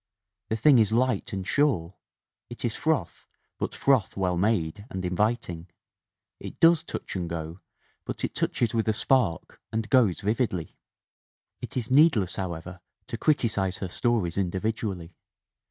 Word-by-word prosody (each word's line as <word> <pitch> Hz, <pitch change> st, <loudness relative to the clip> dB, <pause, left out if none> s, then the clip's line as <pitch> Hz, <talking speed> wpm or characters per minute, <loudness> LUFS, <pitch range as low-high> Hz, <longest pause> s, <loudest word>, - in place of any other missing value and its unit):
The 110 Hz, -, 0 dB
thing 130 Hz, +3 st, +5 dB
is 110 Hz, -1 st, +3 dB
light 120 Hz, -2 st, +1 dB
and 95 Hz, -1 st, -4 dB
sure; 115 Hz, -, +1 dB, 0.6 s
it 120 Hz, +1 st, -5 dB
is 115 Hz, -, 0 dB
froth 155 Hz, -, -1 dB, 0.3 s
but -, -, -3 dB
froth 130 Hz, -9 st, +2 dB
well 90 Hz, -2 st, +1 dB
made 100 Hz, -1 st, 0 dB
and 95 Hz, -6 st, -4 dB
inviting; 90 Hz, -2 st, -1 dB, 0.7 s
it -, -, -9 dB
does 165 Hz, -1 st, +6 dB
touch -, -, -6 dB
and 90 Hz, -3 st, -3 dB
go, 85 Hz, +1 st, -5 dB, 0.4 s
but -, -, -6 dB
it -, -, -2 dB
touches 120 Hz, -, 0 dB
with 110 Hz, -1 st, 0 dB
a -, -, +3 dB
spark 110 Hz, -7 st, 0 dB
and 110 Hz, 0 st, -2 dB
goes 115 Hz, -10 st, +4 dB
vividly. 105 Hz, -6 st, -1 dB, 0.9 s
"It -, -, -6 dB
is 120 Hz, 0 st, -3 dB
needless, 130 Hz, -, +4 dB
however, 90 Hz, -1 st, -5 dB, 0.3 s
to 115 Hz, -, -3 dB
criticise 105 Hz, -, +1 dB
her 95 Hz, -, -5 dB
stories 105 Hz, -5 st, 0 dB
in 95 Hz, -3 st, +1 dB
dividually. 95 Hz, -3 st, -3 dB
105 Hz, 150 wpm, -27 LUFS, 90-120 Hz, 0.9 s, does